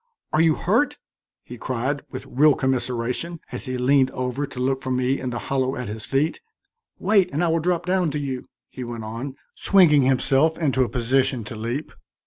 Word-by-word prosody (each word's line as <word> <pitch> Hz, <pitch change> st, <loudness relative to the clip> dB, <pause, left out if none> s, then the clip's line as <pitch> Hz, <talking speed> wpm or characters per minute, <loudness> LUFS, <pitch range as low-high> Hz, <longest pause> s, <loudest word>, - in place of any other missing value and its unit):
"Are 155 Hz, -, +4 dB
you 160 Hz, -2 st, +4 dB
hurt?" -, -, +1 dB, 0.5 s
he 120 Hz, -1 st, -10 dB
cried, 130 Hz, +3 st, -2 dB
with -, -, -7 dB
real 145 Hz, +2 st, +4 dB
commiseration, 130 Hz, +5 st, -2 dB
as -, -, -3 dB
he 130 Hz, -1 st, -3 dB
leaned 130 Hz, +1 st, +3 dB
over 130 Hz, +3 st, -2 dB
to 135 Hz, -2 st, -9 dB
look 135 Hz, +1 st, 0 dB
for 130 Hz, -, -5 dB
me 130 Hz, +1 st, +1 dB
in 130 Hz, -, -3 dB
the 120 Hz, -, -3 dB
hollow 130 Hz, +1 st, -1 dB
at 125 Hz, -3 st, -5 dB
his 110 Hz, +1 st, -4 dB
feet. 145 Hz, -, 0 dB, 0.6 s
"Wait 200 Hz, -4 st, +3 dB
and 155 Hz, +5 st, 0 dB
I 170 Hz, -, +2 dB
will 165 Hz, +1 st, +2 dB
drop 175 Hz, +1 st, 0 dB
down 180 Hz, -2 st, +1 dB
to 150 Hz, +1 st, -3 dB
you," 135 Hz, -3 st, -4 dB, 0.2 s
he 130 Hz, -, -8 dB
went 120 Hz, -2 st, -6 dB
on, 115 Hz, +5 st, -6 dB, 0.2 s
swinging 170 Hz, -7 st, +5 dB
himself 135 Hz, +4 st, +2 dB
into 135 Hz, -5 st, +1 dB
a 125 Hz, -, +2 dB
position 130 Hz, 0 st, +1 dB
to 105 Hz, -, -8 dB
leap. 120 Hz, +7 st, -4 dB
135 Hz, 195 wpm, -23 LUFS, 125-150 Hz, 0.6 s, swinging